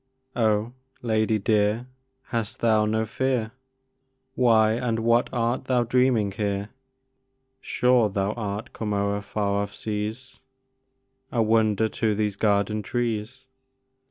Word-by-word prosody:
Oh, 110 0 +1 0.3
lady 110 -1 +1
dear, 105 +2 +1 0.4
hast 115 -3 -3
thou 110 -2 +3
no 110 +1 0
fear? 120 -1 -1 0.8
Why 110 -4 +4
and 115 -1 -1
what 115 +1 +3
art 120 0 -1
thou 125 -2 +2
dreaming 120 -4 +2
here? 100 0 -2 0.9
Sure 125 -4 +2
thou 100 0 -1
art 105 -2 -5
come 105 -2 -3
o'er 100 0 0
far 100 0 -1
off 100 0 -5
seas, 110 +4 -5 0.9
A 115 -2 +2
wonder 110 -1 +2
to 110 0 -1
these 105 -1 -1
garden 105 0 +1
trees! 120 +3 -3
110 Hz, 120 wpm, -25 LUFS, 105-120 Hz, 0.9 s, Why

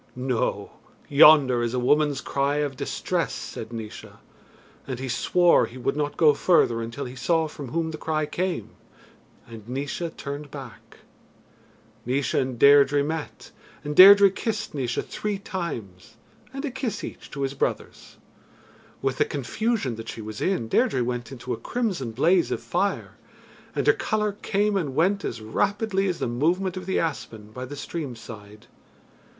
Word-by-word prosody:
"No! 125 -2 -2 0.4
yonder 140 -4 +7
is 120 +1 -1
a - - +1
woman's 145 +2 +2
cry 140 +1 0
of 145 -2 -1
distress," - - -2
said 110 +1 -7
Naois, 110 -2 -8 0.7
and 130 -3 -4
he 130 +1 -5
swore 175 +8 +3
he 125 - -12
would 130 +2 -1
not 145 -1 -2
go 155 -3 +6
further 140 -7 +3
until 115 +5 -5
he 125 +1 -8
saw 160 +5 +1
from 145 -2 -8
whom 160 +5 -2
the 155 - -7
cry 155 -1 -1
came, 180 +3 -3 0.7
and 115 -1 -12
Naois 145 +6 -3
turned 145 +1 -6
back. 135 -5 -11 1.1
Naois 130 +3 -1
and 130 -2 0
Deirdre 140 +2 +6
met, 155 +1 -5 0.3
and 150 0 -4
Deirdre 200 +2 +9
kissed 215 +2 -3
Naois 125 -4 -2
three 210 -1 -3
times, 120 - -6 0.4
and 275 +2 -5
a 280 - -3
kiss 240 -5 -4
each - - -8
to 140 -2 -4
his 135 0 -2
brothers. - - -4 0.9
With 135 -1 -1
the - - +4
confusion 145 - -2
that 115 0 -7
she 115 - -6
was 110 0 -7
in, 185 -12 0
Deirdre 125 +2 +2
went 120 0 -4
into 125 -1 -5
a - - -4
crimson 205 - -2
blaze 165 +10 +2
of - - -2
fire, 195 +3 -2 0.6
and - - 0
her 430 - +6
colour 215 - -1
came 205 +1 -1
and 150 -9 -2
went 195 +6 +2
as 115 - -4
rapidly 195 - 0
as 180 -2 -1
the - - -2
movement 170 +10 0
of 185 -1 -7
the 190 - 0
aspen 110 -9 -4
by 125 +3 -6
the 145 +3 -8
stream 145 -2 -5
side. 105 -2 -12
145 Hz, 165 wpm, -25 LUFS, 125-180 Hz, 1.1 s, Deirdre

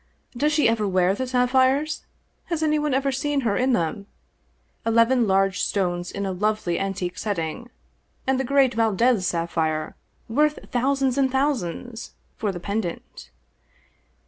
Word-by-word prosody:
Does 295 +5 +1
she 300 -4 +3
ever 225 -2 +1
wear 185 -1 +2
the 260 +6 -3
sapphires? 260 +4 +2 0.4
Has 335 -3 -2
anyone 300 -1 +1
ever 275 +1 +1
seen 280 +1 -1
her 220 -5 0
in 255 +4 +2
them? 200 +1 -1 0.8
Eleven 230 +1 +3
large 195 0 +2
stones 175 -3 -1
in 200 0 -3
a 190 - -1
lovely 200 -2 -1
antique 195 -2 -3
setting, 205 +4 -3 0.6
and 265 0 +1
the - - +1
great 270 -1 +3
Valdez 225 -2 +2
sapphire 160 -2 -1 0.2
— - - -41
^worth 300 +6 0
thousands 270 +1 +1
and 265 -1 +2
thousands 245 - -2
— - - -40
for 210 - 0
the 175 - -6
pendant." 200 -1 -5
230 Hz, 145 wpm, -24 LUFS, 195-265 Hz, 0.8 s, she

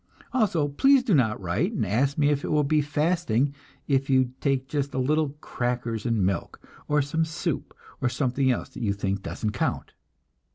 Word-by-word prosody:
Also 190 - +2
please 270 - +4
do 235 -6 +1
not 115 -8 +2
write 100 - -1
and 190 - 0
ask 130 +9 +1
me 145 -1 +3
if 145 -1 0
it - - -3
will 150 -1 +2
be 150 +2 +2
fasting 150 -3 +1 0.3
if 135 -1 +1
you 130 -2 +3
take 135 -2 0
just 140 -1 -2
a - - -1
little 145 +2 +1
crackers 120 -2 -2
and 110 -5 +1
milk, 95 +1 -2 0.3
or 150 -1 +2
some 160 +4 0
soup, 160 -1 -3 0.3
or 130 - +2
something 130 +1 0
else 125 - -1
that 130 - -9
you 105 -4 +1
think 100 -1 -2
doesn't 105 +2 -3
count! 105 - -2
135 Hz, 190 wpm, -26 LUFS, 120-150 Hz, 0.3 s, please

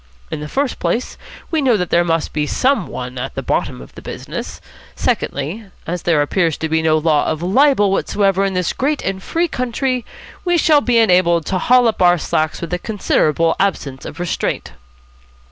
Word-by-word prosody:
In - - -3
the 150 - -5
first 275 - -2
place, 245 - -1 0.4
we 320 -2 +1
know 250 -5 +3
that 180 -3 -3
there 175 - +4
must 165 -2 -1
be 150 -1 -1
some 260 - +1
one 125 0 -6
at 135 +2 -5
the - - -4
bottom 60 - -1
of - - -16
the - - -11
business. - - -7 0.4
Secondly, 160 +11 -2 0.2
as 175 0 -3
there 160 -4 +2
appears 165 0 0
to 160 - -2
be 160 0 +1
no 160 -1 +3
law 155 -2 +2
of 155 +1 -2
libel 205 +1 +3
whatsoever 195 0 +1
in 195 -1 -1
this 180 -1 0
great 290 +3 -1
and 190 0 -3
free 335 - 0
country, 255 -1 -2 0.4
we 350 -1 +2
shall 310 -3 +4
be 245 -3 +2
enabled 180 -6 +4
to 185 - -1
haul 250 +2 +4
up 220 - -1
our 175 0 +5
slacks 155 -1 -1
with 170 0 -5
a 180 - 0
considerable 165 -6 +1
absence 145 -9 -1
of 145 - -8
restraint." 175 -2 -2
180 Hz, 195 wpm, -18 LUFS, 160-240 Hz, 0.4 s, our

